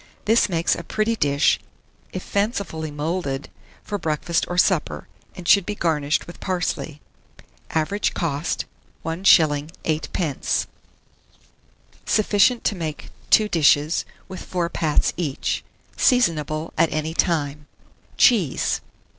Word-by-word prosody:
This 225 0 +4
makes 170 -2 +1
a 170 - -4
pretty 215 +5 0
dish, 140 -8 +2 0.5
if 185 - -5
fancifully 200 -7 -2
moulded, 145 -2 -3 0.3
for 205 -1 -4
breakfast 160 +1 0
or 175 - -4
supper, - - +1 0.3
and 180 -3 -8
should 200 +1 +6
be 210 - -4
garnished 150 -5 0
with 170 - -11
parsley. 175 -4 -3 0.7
Average 175 +6 -1
cost, 150 -1 -2 0.4
1s. 160 -3 +3 0.2
8d. 155 -1 -1 1.4
Sufficient 215 +3 +3
to - - +1
make 160 -5 -6 0.2
2 215 - +5
dishes, 155 -3 +3 0.2
with 185 - -8
4 175 -2 -2
pats 155 -3 +1
each. 150 -6 -2 0.3
Seasonable 160 - +1
at 165 - +4
any 155 +1 -2
time. 150 -4 -1 0.5
CHEESE. 200 - +3
165 Hz, 115 wpm, -23 LUFS, 150-190 Hz, 1.4 s, should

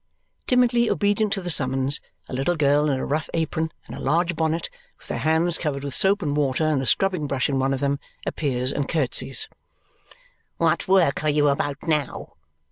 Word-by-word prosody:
Timidly 240 -2 +3
obedient 205 0 +1
to 195 - -2
the 175 - +1
summons, 135 -1 +2 0.3
a - - -9
little 135 +7 0
girl 150 0 +2
in 135 - 0
a - - -3
rough 155 +3 -2
apron 160 0 -1
and - - -9
a - - -8
large 170 +5 0
bonnet, 160 +1 -1 0.3
with - - -18
her - - -2
hands 160 +6 +2
covered 140 -4 -3
with 140 -2 -5
soap 195 +4 +3
and 145 -2 -1
water 145 +1 +1
and 150 -3 +1
a 130 - -3
scrubbing 180 - +1
brush 135 -2 0
in 135 -2 -1
one 135 +1 +1
of 135 0 -2
them, 140 0 0 0.3
appears, 130 -4 -1
and 145 -1 -3
curtsys. 135 -3 +1 1.1
"What - - +1
work 185 -7 +3
are 155 - +2
you 145 0 +3
about 140 0 -1
now?" 150 -4 -2
150 Hz, 195 wpm, -23 LUFS, 140-170 Hz, 1.1 s, Timidly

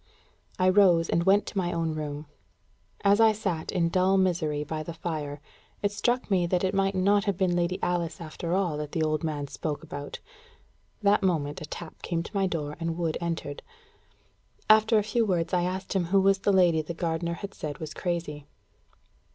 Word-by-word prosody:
I 185 - +3
rose, 185 -4 +5
and 170 - +1
went 200 +2 +5
to - - -7
my 175 -1 -1
own 165 -2 -1
room. 150 -1 -5 0.8
As 200 +1 +4
I 220 -1 +6
sat 190 -7 -3
in 170 -3 +1
dull 185 +2 +3
misery 165 -6 +1
by 155 +1 -4
the 165 +1 -7
fire, 150 -3 -4 0.4
it 205 - +2
struck 240 +3 -1
me 180 -3 +3
that 180 +1 0
it 190 +1 +1
might 195 0 +1
not 200 +2 +3
have 200 -4 0
been 185 -2 +1
Lady 175 +1 0
Alice 170 -2 -1
after 170 +1 -3
all 180 -6 0
that 150 -1 -5
the 160 - +1
old 155 +1 0
man 150 -3 -2
spoke 145 +1 -4
about. 145 -3 -7 0.8
That 205 +1 +4
moment 155 -6 0
a - - -5
tap 165 +1 -9
came 170 -1 -2
to 205 - -11
my 195 -1 +2
door, 150 -4 -3
and 165 0 -2
Wood 165 -3 -1
entered. 165 -4 -3 1.1
After 220 +1 +5
a 210 - +3
few 225 +3 +1
words, 180 -4 0
I 175 -1 +2
asked 185 +1 -3
him 190 -3 +1
who 195 +3 +3
was 195 0 +3
the 200 - +2
lady 175 -4 +4
the 165 +2 -6
gardener 170 0 -2
had 200 +3 -7
said 145 -2 -5
was 155 -2 -6
crazy. 165 -5 -3
175 Hz, 200 wpm, -27 LUFS, 160-195 Hz, 1.1 s, I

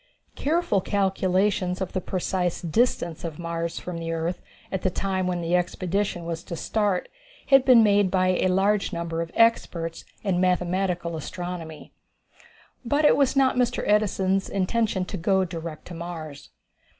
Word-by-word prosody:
Careful 300 - +1
calculations 190 -1 +1
of 190 -2 -4
the 185 - -1
precise 180 -1 -1
distance 170 -2 0
of 165 -3 -5
Mars 170 0 -3
from 180 -2 -5
the 165 0 -4
earth 165 +2 -2 0.3
at 190 - -2
the 185 - +1
time 190 0 -1
when 180 -1 -1
the 170 +1 +1
expedition 180 0 -1
was 165 0 -4
to 170 - -5
start 205 +1 0 0.4
had 270 -2 +6
been 245 -4 +7
made 205 -2 +4
by 185 0 +2
a 185 0 +2
large 195 +3 +2
number 170 -2 -3
of 165 - -4
experts 170 -8 +1 0.2
in 185 -3 +1
mathematical 180 -1 0
astronomy. 165 0 -7 0.9
But 285 +5 +1
it - - +6
was 280 -1 +2
not 265 -2 +3
Mr. 250 -1 +1
Edison's 195 -2 +2
intention 195 0 0
to 195 - -5
go 190 +2 +2
direct 165 -3 -7
to - - -7
Mars. 165 -4 -7
185 Hz, 155 wpm, -25 LUFS, 170-200 Hz, 0.9 s, been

